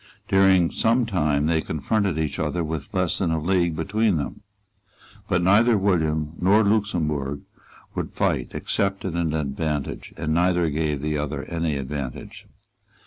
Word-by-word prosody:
During 95 -3 +4
some 115 +2 +2
time 75 -8 +1
they 80 0 +2
confronted 95 +4 -1
each 75 -3 -2
other 80 +3 -1
with 80 -3 -5
less 90 -2 0
than 90 - +1
a 80 0 0
league 85 0 +1
between 100 +4 +1
them. 75 - -5 0.9
But 90 0 +2
neither 110 +5 +5
William 80 -6 0
nor 100 +5 +4
Luxemburg 80 -10 0 0.5
would - - -4
fight - - 0
except 100 -1 -1
at 95 - -2
an 85 -2 -1
advantage; 75 0 -3
and 80 0 -1
neither 85 -1 +2
gave 75 -2 -1
the 75 -1 -1
other 75 -1 -3
any 85 -2 -2
advantage. 70 -1 -6
80 Hz, 145 wpm, -24 LUFS, 75-95 Hz, 0.9 s, neither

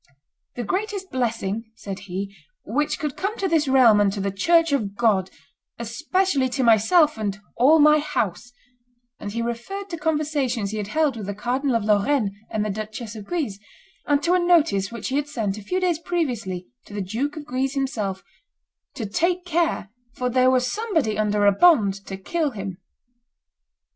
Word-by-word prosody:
"The 245 - -3
greatest 390 - -3
blessing," 225 -4 -2
said 195 -3 -7
he, 195 +2 -4 0.3
"which 290 +8 0
could 300 -3 -3
come 405 +4 -3
to 390 - 0
this 320 -4 +2
realm 245 -6 +6
and 200 -1 +3
to 205 - -4
the 195 0 -1
church 330 - +3
of 210 -8 -1
God, 200 -5 +2 0.5
especially 285 - 0
to 260 +1 -1
myself 240 - +4
and 205 -2 -2 0.2
all 280 +7 +6
my 300 0 +6
house;" 245 - -2 0.7
and 205 - -5
he 230 +2 -2
referred 365 +13 -5
to 335 - -3
conversations 290 -9 0
he 215 - -4
had 205 -2 -3
held 295 +1 +1
with 210 -3 -6
the 205 - -4
Cardinal 255 +4 0
of 230 - +1
Lorraine 210 +2 +2 0.2
and 215 -1 -1
the 210 - -1
Duchess 215 +2 -6
of 210 -2 -8
Guise, 275 - -2 0.5
and 290 0 +2
to 345 - +3
a 365 - +4
notice 325 - +3
which 230 -3 -5
he 270 - 0
had 290 0 -1
sent, 215 -8 -2
a - - -11
few 365 - -1
days 355 -4 +1
previously, 245 - -2 0.2
to 205 - -11
the 205 - -2
Duke 240 +11 -3
of 300 - -7
Guise 265 0 -2
himself, 215 -9 -2 0.7
"to 225 - -4
take 345 - 0
care, 330 - 0 0.2
for 250 0 -1
there 255 +1 +4
was 255 -1 +3
somebody 320 - 0
under 210 -1 +1
a 200 - +7
bond 200 - +4
to 195 - -5
kill 310 - -1
him." 195 -6 -6
245 Hz, 185 wpm, -23 LUFS, 205-310 Hz, 0.7 s, a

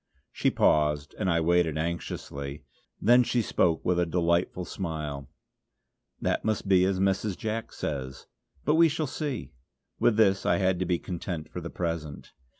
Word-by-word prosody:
She - - +1
paused, 75 -1 +2
and 95 -3 0
I 85 -1 +2
waited 85 -2 +2
anxiously. 75 -3 -4 0.4
Then 120 +3 +6
she 120 -1 +1
spoke 85 -5 +1
with 90 -1 +2
a 90 - +3
delightful 85 +1 0
smile: 75 -7 -5 0.9
"That - - 0
must 110 -3 -1
be 95 -1 +5
as 95 -1 0
Mrs. 95 0 0
Jack 110 -1 -3
says. 65 -2 -5 0.4
But 150 - +3
we 165 +1 +6
shall 155 +1 -1
see!" 145 -3 -4 0.5
With 110 - +3
this 95 -3 +4
I - - +2
had 95 -2 +1
to 95 - 0
be 90 -1 +2
content 85 -2 -5
for 90 - -6
the 85 - -6
present. 80 -5 -4
90 Hz, 160 wpm, -28 LUFS, 80-100 Hz, 0.9 s, Then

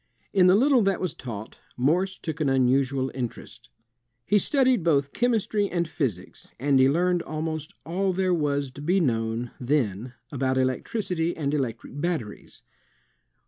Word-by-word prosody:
In 185 -2 +5
the 185 - +6
little 260 +3 +4
that 195 -2 +1
was 185 - -2
taught, 110 -4 -8 0.2
Morse 175 +9 +1
took 160 -1 -5
an 150 - +2
imusual 130 +1 +2
interest. 125 -3 -7 0.6
He 210 - +3
studied 260 - +2
both 140 -4 +2
chemistry 220 -4 +1
and 170 -2 -1
physics, 125 - -4
and 140 +1 +3
he 130 +1 +6
learned 175 +3 +2
almost 155 -1 -4
all 190 +4 0
there 185 0 +1
was 145 -4 0
to 140 - -10
be 180 +6 +2
known 115 -5 -1
then 125 -3 -1 0.2
about 130 -2 0
electricity 165 - -1
and 145 -2 -1
electric 135 0 -3
batteries. 160 -12 -4
150 Hz, 145 wpm, -26 LUFS, 130-180 Hz, 0.6 s, the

